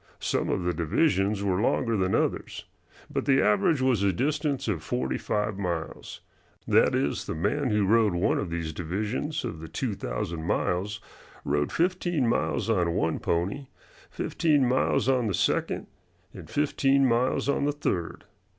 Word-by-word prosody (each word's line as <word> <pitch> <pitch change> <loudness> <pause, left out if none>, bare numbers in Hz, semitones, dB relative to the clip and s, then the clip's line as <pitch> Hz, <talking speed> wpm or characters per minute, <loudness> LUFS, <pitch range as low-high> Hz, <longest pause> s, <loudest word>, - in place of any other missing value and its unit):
Some - - -1
of 90 - 0
the 90 0 0
divisions 95 - +1
were 95 -1 +1
longer 115 0 +1
than 95 -2 +1
others. - - -2 0.5
But - - -2
the 135 -1 +4
average 105 - +3
was 125 -6 +2
a 100 -1 +3
distance 145 - -1
of 95 -8 -1
forty 65 -3 -2
five 105 -1 -2
miles; 85 -4 -4 0.5
that - - +4
is, 70 - -1
the - - -4
man 120 - 0
who 105 -2 +2
rode 110 -2 +3
one 85 - +1
of 95 - -3
these 85 -1 -3
divisions 105 - -3
of 80 - -5
the 80 - -8
two 105 - -3
thousand 80 +1 -4
miles, 100 +4 -1 0.4
rode 75 0 0
fifteen 175 -5 0
miles 115 - 0
on 90 -7 +1
one 80 -1 0
pony, 100 +12 -1 0.4
fifteen 145 -5 +1
miles 130 +1 +1
on 130 -3 +2
the 100 - 0
second, - - 0 0.5
and - - -11
fifteen 140 -2 +2
miles 125 +2 +1
on 140 0 +1
the 145 - +2
third. 95 - -3
105 Hz, 160 wpm, -27 LUFS, 85-135 Hz, 0.5 s, the